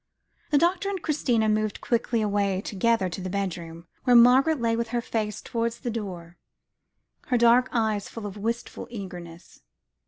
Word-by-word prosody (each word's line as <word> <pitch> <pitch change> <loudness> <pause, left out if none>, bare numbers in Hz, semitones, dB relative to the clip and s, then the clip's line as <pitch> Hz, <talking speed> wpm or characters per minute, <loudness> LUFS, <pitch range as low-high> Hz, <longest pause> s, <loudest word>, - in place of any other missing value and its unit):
The 295 - +3
doctor 350 +5 +2
and 390 -2 -3
Christina 250 -9 +1
moved 215 -1 0
quickly 230 -1 0
away 200 -2 0
together 210 0 +1
to 180 +1 -6
the 185 - -4
bedroom, 170 -4 -4 0.2
where 250 -1 +4
Margaret 260 +6 +6
lay 230 -1 +1
with 230 0 -2
her 240 +1 -1
face 215 -2 -3
towards 230 0 -3
the 240 - -3
door, 180 -6 -6 0.9
her 250 - +2
dark 235 +2 +5
eyes 220 -4 0
full 225 -2 -8
of 200 -1 -6
wistful 230 +3 -4
eagerness. 180 -6 -9
225 Hz, 160 wpm, -26 LUFS, 195-240 Hz, 0.9 s, Margaret